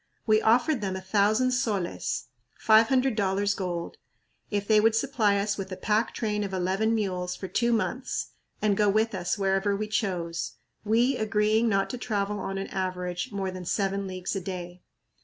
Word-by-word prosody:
We 215 -1 +4
offered 245 +4 +3
them 190 -2 -2
a - - -3
thousand 210 +6 +2
soles 210 -8 -1 0.3
(five 220 +1 +5
hundred 260 -2 +2
dollars 200 0 +1
gold) 175 -4 -4 0.5
if 205 -1 -2
they 215 -1 +5
would 220 +1 +4
supply 225 -5 +2
us 205 +1 -1
with 190 0 -5
a 185 - -5
pack 215 +4 +1
train 210 -2 -1
of 195 -1 -3
eleven 190 +5 +1
mules 180 -4 -2
for 190 - -6
two 235 +5 +1
months 245 +3 -1 0.3
and 210 -2 +3
go 210 0 +3
with 220 +2 +2
us 180 +1 -1
wherever 195 +1 +1
we 215 +1 -3
chose, 175 -6 -2 0.3
we 235 +5 +2
agreeing 215 +2 +2
not 195 -1 +2
to 250 - -5
travel 205 -3 -1
on 195 0 -4
an 195 - -3
average 180 -1 -3
more 195 -2 -2
than 185 -1 -7
seven 195 +1 -1
leagues 185 +1 -4
a 195 - -2
day. 180 -1 -6
205 Hz, 180 wpm, -27 LUFS, 190-220 Hz, 0.5 s, five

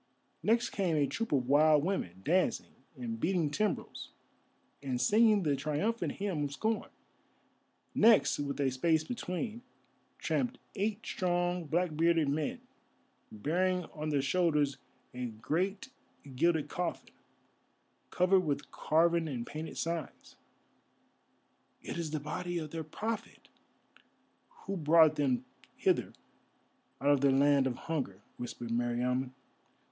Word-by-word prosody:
Next 230 +3 +2
came 185 -5 0
a 145 -2 +3
troop 230 +10 -3
of 130 -4 +1
wild 150 +1 +5
women, 95 - -3
dancing, 180 +4 +1 0.2
and 115 -2 -5
beating 165 -2 +1
timbrels, 210 +6 -2 0.7
and 130 -3 -2
singing 210 - +4
the 145 -3 +2
triumphant 155 +12 -1
hymn 190 -7 -2
of 140 - -5
scorn. 220 +7 -1 1.0
Next, 225 -7 +5
with 140 -1 -3
a 135 -2 +2
space 160 +4 +2
between, 220 +3 -4 0.6
tramped 255 0 -1 0.2
eight 210 +2 -2
strong 175 -1 0
black 165 +1 0
bearded 165 -2 +3
men, 150 +1 -2 0.7
bearing 180 - 0
on 155 0 -4
their 145 -3 +1
shoulders 150 -3 +2 0.4
a 125 0 -4
great 165 - -2 0.5
gilded 160 +1 +2
coffin, 175 +2 -4 1.0
covered 185 +1 +4
with 150 -6 -2
carven 165 +1 +2
and 125 -5 -4
painted 155 +1 -7
signs. 165 -3 -4 1.5
"It - - -5
is 165 -2 -2
the 155 0 -2
body 175 +4 -4
of 155 -3 -5
their 165 -1 -4
Prophet, 220 +8 -5 1.2
who 195 - -3
brought 160 -1 +5
them 130 -4 0 0.3
hither - - +1 0.9
out 140 - +1
of 140 -2 +3
their 140 - +5
land 140 0 +4
of 125 - -2
hunger," 125 -11 -4
whispered 120 -1 -6
Meriamun. 120 +2 0
155 Hz, 125 wpm, -32 LUFS, 140-180 Hz, 1.5 s, wild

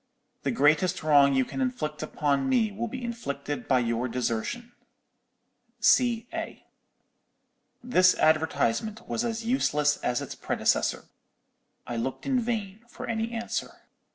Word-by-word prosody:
The - - -1
greatest 155 +5 +2
wrong 140 -3 +5
you 130 -1 +3
can 270 - -5
inflict 245 -13 -2
upon 145 - 0
me 235 -5 +2
will 225 +4 -3
be 255 +2 -6
inflicted 145 -12 -4
by 130 -2 +3
your 120 +1 -1
desertion_. 125 - -3 1.1
C. 235 0 +3
A.' 330 0 -6 1.2
"This 185 -7 +4
advertisement 160 - +1
was 230 - -1
as 230 -1 -3
useless 150 - +2
as 125 0 -1
its - - -6
predecessor. - - 0 0.8
I 120 - -4
looked 130 +3 -3
in 265 -2 +2
vain 220 -4 -3
for - - -8
any 225 0 -2
answer. 230 0 -4
190 Hz, 130 wpm, -27 LUFS, 140-235 Hz, 1.2 s, wrong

